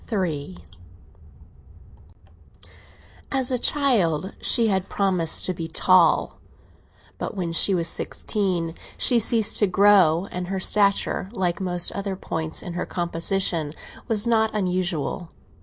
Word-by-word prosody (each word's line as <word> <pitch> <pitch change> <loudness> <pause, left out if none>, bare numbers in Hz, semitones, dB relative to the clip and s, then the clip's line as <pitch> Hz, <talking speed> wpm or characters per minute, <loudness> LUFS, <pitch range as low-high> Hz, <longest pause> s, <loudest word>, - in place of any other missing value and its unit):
III 155 - -3 2.7
AS 265 -1 -1
a 250 - 0
child 200 - +1
she 235 - +3
had 190 -2 -1
promised 185 -5 0
to 185 - -1
be 165 -2 -6
tall, 170 0 +2 0.8
but 205 - -5
when 175 -3 -3
she 190 +3 +3
was 170 -2 0
sixteen 180 -6 -2 0.2
she 245 - +5
ceased 225 -1 +3
to 205 - +2
grow, 190 -3 +4
and 180 0 -5
her 190 +1 -3
stature, 200 -1 +1
like 185 -3 -2
most 175 -2 0
other 200 -1 -4
points 160 -3 -4
in 175 - -7
her 175 - -4
composition, 170 -2 -1 0.3
was 225 -2 +1
not 220 -2 +2
unusual. 180 -4 -2
185 Hz, 125 wpm, -23 LUFS, 170-205 Hz, 2.7 s, she